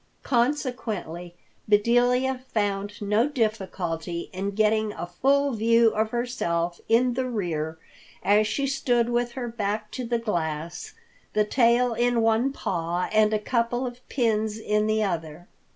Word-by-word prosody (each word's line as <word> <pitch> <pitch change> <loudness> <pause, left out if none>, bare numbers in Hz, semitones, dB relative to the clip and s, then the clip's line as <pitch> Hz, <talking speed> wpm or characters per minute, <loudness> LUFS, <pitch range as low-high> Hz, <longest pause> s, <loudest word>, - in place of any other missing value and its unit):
Consequently 230 - -1 0.3
Bedelia 245 +4 +3
found 205 -1 -1
no 210 +5 +2
difficulty 185 - -2
in 190 +2 -2
getting 215 0 +2
a - - -5
full 280 +9 +2
view 230 0 +4
of 220 0 0
herself 175 -9 -2
in 240 +2 +4
the 255 +1 -1
rear 160 -8 -2 0.5
as 210 +1 +4
she 275 +6 -1
stood 245 -3 +1
with 240 0 0
her 250 -2 -4
back 215 -2 -3
to 255 - -4
the 235 0 0
glass, 170 -6 -3 0.4
the 210 0 +3
tail 240 +1 +3
in 240 0 +1
one 225 +4 +2
paw 175 -7 -2
and 215 0 +4
a 215 - +2
couple 235 +3 -1
of 245 0 -6
pins 220 -4 0
in 210 -1 0
the 215 0 +1
other. 170 -3 -4
220 Hz, 140 wpm, -25 LUFS, 195-240 Hz, 0.5 s, view